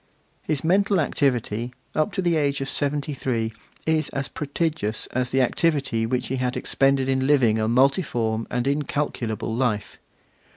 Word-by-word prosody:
His 150 Hz, -3 st, -2 dB
mental 195 Hz, +3 st, +3 dB
activity, 125 Hz, -5 st, 0 dB, 0.2 s
up 155 Hz, +7 st, +1 dB
to 190 Hz, -, -1 dB
the 175 Hz, -1 st, +2 dB
age 140 Hz, -2 st, +1 dB
of 135 Hz, -, -2 dB
seventy 145 Hz, +1 st, -1 dB
three, 115 Hz, -4 st, -2 dB, 0.3 s
is 160 Hz, -1 st, +1 dB
as 140 Hz, -1 st, -4 dB
prodigious 150 Hz, -7 st, -2 dB
as 125 Hz, 0 st, 0 dB
the 130 Hz, +1 st, +2 dB
activity 135 Hz, -5 st, +1 dB
which 125 Hz, +1 st, -1 dB
he 130 Hz, -, -1 dB
had 125 Hz, 0 st, -1 dB
expended 135 Hz, -1 st, +2 dB
in 130 Hz, 0 st, +1 dB
living 120 Hz, -7 st, +4 dB
a 110 Hz, -, +1 dB
multiform 120 Hz, -3 st, +1 dB
and 125 Hz, 0 st, -1 dB
incalculable 140 Hz, -6 st, -1 dB
life. 115 Hz, -4 st, -1 dB
135 Hz, 155 wpm, -24 LUFS, 120-150 Hz, 0.3 s, living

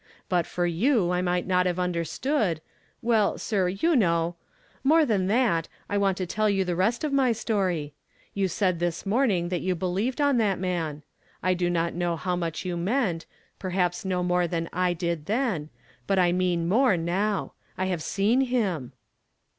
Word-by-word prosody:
But 175 Hz, -3 st, +1 dB
for 175 Hz, -, -1 dB
you 180 Hz, -, +2 dB
I 180 Hz, 0 st, +1 dB
might 180 Hz, 0 st, 0 dB
not 180 Hz, 0 st, +2 dB
have 175 Hz, -1 st, -1 dB
understood 180 Hz, -, 0 dB, 0.2 s
— -, -, -38 dB
Well, 225 Hz, -3 st, +2 dB
sir, 195 Hz, -5 st, 0 dB
you 250 Hz, -, +1 dB
know 170 Hz, -6 st, +2 dB, 0.3 s
— -, -, -33 dB
^Nlore 310 Hz, +3 st, +5 dB
than 200 Hz, -7 st, +1 dB
that, 210 Hz, -7 st, +2 dB, 0.2 s
I 205 Hz, -, -1 dB
Avant 195 Hz, -2 st, +2 dB
to 185 Hz, -, -2 dB
tell 215 Hz, +4 st, 0 dB
you 195 Hz, -2 st, +1 dB
the 175 Hz, -1 st, -1 dB
rest 220 Hz, -, +1 dB
of 300 Hz, -2 st, -1 dB
my 260 Hz, -3 st, +3 dB
story. 185 Hz, -9 st, -1 dB, 0.4 s
You 195 Hz, -1 st, +1 dB
said 185 Hz, -1 st, 0 dB
this 175 Hz, +2 st, -2 dB
morning 200 Hz, -5 st, +1 dB
that 180 Hz, -2 st, -1 dB
3()U 185 Hz, -1 st, -1 dB
believed 190 Hz, -, -1 dB
on 285 Hz, -3 st, +3 dB
that 205 Hz, -4 st, +2 dB
man. 165 Hz, -5 st, -3 dB, 0.4 s
I 185 Hz, +1 st, +3 dB
do 175 Hz, -1 st, 0 dB
not 170 Hz, -1 st, 0 dB
know 175 Hz, -1 st, -1 dB
how 180 Hz, +2 st, -2 dB
much 170 Hz, 0 st, -3 dB
you 180 Hz, -1 st, -2 dB
meant, 185 Hz, -, 0 dB, 0.3 s
perhaps 180 Hz, -2 st, -1 dB
no 185 Hz, -2 st, -1 dB
nu:)re 180 Hz, 0 st, +2 dB
than 165 Hz, 0 st, -3 dB
I 180 Hz, 0 st, +1 dB
did 170 Hz, -3 st, -3 dB
then; 215 Hz, -, -1 dB, 0.4 s
but 195 Hz, -, +2 dB
I 180 Hz, -2 st, +4 dB
mean 175 Hz, -2 st, 0 dB
more 220 Hz, 0 st, +3 dB
now. 190 Hz, +5 st, -1 dB, 0.2 s
I 185 Hz, -, 0 dB
have 180 Hz, -3 st, -1 dB
seen 205 Hz, -, +2 dB
him." 205 Hz, -, -1 dB
185 Hz, 185 wpm, -26 LUFS, 175-215 Hz, 0.4 s, ^Nlore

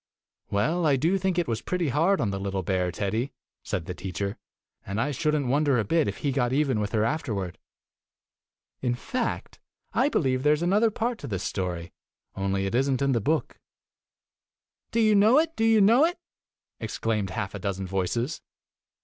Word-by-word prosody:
"Well, 155 Hz, +12 st, +1 dB
I 140 Hz, -, +4 dB
do 165 Hz, +9 st, +1 dB
think 190 Hz, -1 st, 0 dB
it 175 Hz, -3 st, +1 dB
was 115 Hz, -1 st, -2 dB
pretty 180 Hz, -4 st, -1 dB
hard 165 Hz, +9 st, +2 dB
on 105 Hz, -, 0 dB
the 95 Hz, -, -3 dB
little 95 Hz, -1 st, -2 dB
bear, 90 Hz, 0 st, 0 dB
Teddy," 110 Hz, +8 st, -2 dB, 0.3 s
said 85 Hz, -, -3 dB
the 90 Hz, -, -4 dB
teacher, 100 Hz, +2 st, -4 dB, 0.5 s
"and 100 Hz, +3 st, -4 dB
I 140 Hz, +5 st, 0 dB
should 150 Hz, +3 st, 0 dB
n't 145 Hz, -2 st, 0 dB
wonder 140 Hz, +1 st, +2 dB
a 115 Hz, -, +2 dB
bit 160 Hz, +9 st, +2 dB
if -, -, -3 dB
he 140 Hz, -, +2 dB
got 125 Hz, -2 st, +1 dB
even 135 Hz, -4 st, +1 dB
with 105 Hz, -1 st, -2 dB
her 110 Hz, -1 st, +2 dB
afterward. 110 Hz, -, -2 dB, 1.2 s
In 120 Hz, -2 st, 0 dB
fact, 245 Hz, -, -3 dB, 0.3 s
I 270 Hz, -, +3 dB
believe 130 Hz, -, +1 dB
there 150 Hz, +2 st, +4 dB
is 155 Hz, -, -4 dB
another 205 Hz, +6 st, +3 dB
part 230 Hz, +2 st, -2 dB
to 140 Hz, -, -7 dB
this 95 Hz, -6 st, -3 dB
story, 90 Hz, -3 st, -3 dB, 0.4 s
only 95 Hz, 0 st, -1 dB
it 95 Hz, -, -3 dB
is 135 Hz, +3 st, +2 dB
n't 135 Hz, 0 st, +1 dB
in 140 Hz, -, +2 dB
the 120 Hz, -3 st, +1 dB
book." 155 Hz, +8 st, -1 dB, 1.3 s
"Do 230 Hz, -, 0 dB
you 215 Hz, -1 st, +5 dB
know 210 Hz, +6 st, +6 dB
it? 325 Hz, +1 st, +2 dB
Do 225 Hz, -, +1 dB
you 225 Hz, -1 st, +5 dB
know^it?" 260 Hz, -, +5 dB, 0.6 s
ex -, -, -5 dB
claimed 105 Hz, -4 st, -1 dB
half 95 Hz, +1 st, -4 dB
a 100 Hz, -, -5 dB
dozen 95 Hz, 0 st, -3 dB
voices. 95 Hz, -, -2 dB
130 Hz, 190 wpm, -26 LUFS, -, 1.3 s, know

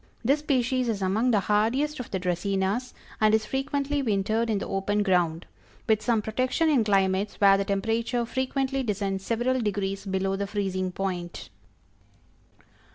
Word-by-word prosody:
This 280 Hz, +5 st, +3 dB
species 255 Hz, -4 st, 0 dB
is 205 Hz, -3 st, -1 dB
among 215 Hz, +7 st, +1 dB
the 215 Hz, -4 st, +3 dB
hardiest 235 Hz, +10 st, +1 dB
of 250 Hz, -, -6 dB
the 190 Hz, -, -2 dB
Dracænas, 190 Hz, +6 st, -1 dB, 0.3 s
and 215 Hz, 0 st, +5 dB
is 220 Hz, -1 st, 0 dB
frequently 280 Hz, +3 st, -1 dB
wintered 220 Hz, 0 st, 0 dB
in 215 Hz, -, +1 dB
the -, -, -4 dB
open 205 Hz, +2 st, 0 dB
ground, 175 Hz, -4 st, +1 dB, 0.4 s
with 220 Hz, -2 st, +3 dB
some 225 Hz, -3 st, +1 dB
protection 255 Hz, +9 st, 0 dB
in 270 Hz, -7 st, +3 dB
climates 195 Hz, -1 st, +1 dB
where 195 Hz, -1 st, +6 dB
the 195 Hz, 0 st, 0 dB
temperature 225 Hz, +4 st, 0 dB
frequently 265 Hz, +2 st, -1 dB
descends 200 Hz, -4 st, -2 dB
several 240 Hz, +4 st, 0 dB
degrees 195 Hz, -2 st, -2 dB
below 190 Hz, 0 st, 0 dB
the 200 Hz, +1 st, -3 dB
freezing 190 Hz, -2 st, -2 dB
point. 180 Hz, -2 st, -4 dB
210 Hz, 155 wpm, -26 LUFS, 195-250 Hz, 0.4 s, where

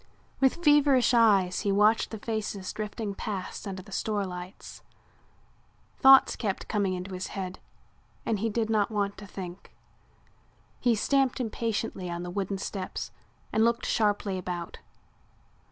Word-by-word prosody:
With 270 Hz, +6 st, +2 dB
feverish 285 Hz, -4 st, +5 dB
eyes 200 Hz, -6 st, +4 dB
he 200 Hz, -, 0 dB
watched 210 Hz, +3 st, +4 dB
the 220 Hz, -, -6 dB
faces 210 Hz, -3 st, -4 dB
drifting 210 Hz, 0 st, -4 dB
past 195 Hz, 0 st, -5 dB
under 190 Hz, -1 st, -5 dB
the 200 Hz, -, -15 dB
store 205 Hz, 0 st, -1 dB
lights. 180 Hz, +1 st, -8 dB, 1.2 s
Thoughts 270 Hz, 0 st, +7 dB
kept 200 Hz, -5 st, -3 dB
coming 200 Hz, -3 st, 0 dB
into 185 Hz, +1 st, -6 dB
his 185 Hz, 0 st, -4 dB
head 185 Hz, -1 st, -5 dB, 0.7 s
and 220 Hz, -3 st, 0 dB
he 225 Hz, +3 st, 0 dB
did 225 Hz, +1 st, 0 dB
not 215 Hz, -2 st, +2 dB
want 205 Hz, -2 st, -1 dB
to 205 Hz, -, -10 dB
think. 185 Hz, -1 st, -9 dB, 1.0 s
He 240 Hz, -2 st, +3 dB
stamped 270 Hz, +4 st, +2 dB
impatiently 225 Hz, -5 st, -2 dB
on 170 Hz, 0 st, -4 dB
the 175 Hz, -, -5 dB
wooden 195 Hz, +1 st, -2 dB
steps 190 Hz, -1 st, -5 dB, 0.4 s
and 220 Hz, -, +3 dB
looked 235 Hz, +1 st, +2 dB
sharply 205 Hz, -3 st, +1 dB
about. 175 Hz, -2 st, -5 dB
205 Hz, 140 wpm, -28 LUFS, 190-225 Hz, 1.2 s, Thoughts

